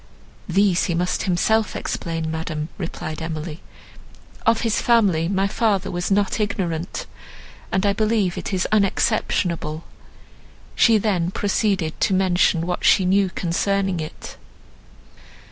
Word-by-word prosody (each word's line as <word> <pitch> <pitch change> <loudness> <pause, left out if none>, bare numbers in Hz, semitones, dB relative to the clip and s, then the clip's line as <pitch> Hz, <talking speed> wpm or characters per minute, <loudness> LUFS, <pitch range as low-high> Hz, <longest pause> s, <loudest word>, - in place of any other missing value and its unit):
"These 190 0 +3
he 170 - -1
must 180 +1 -1
himself 220 +5 +1
explain, 165 -1 -3
madam," 160 -1 -4
replied 165 -3 -5
Emily. 160 0 -5 0.9
"Of 225 0 +4
his 225 -2 0
family 200 -9 +3
my 195 +1 +1
father 200 -2 0
was 175 0 -2
not 200 +2 +1
ignorant, 180 -5 -2 0.7
and 190 +2 +1
I 200 - +3
believe 210 -3 +1
it - - -5
is 185 -1 0
unexceptionable." 185 -6 0 0.9
She 230 -2 +5
then 190 -5 0
proceeded 195 -4 -1
to 190 - +2
mention 180 -3 +2
what 180 0 -3
she 190 - +5
knew 195 +1 +3
concerning 190 +1 -1
it. 155 -1 -8
185 Hz, 125 wpm, -22 LUFS, 170-200 Hz, 0.9 s, She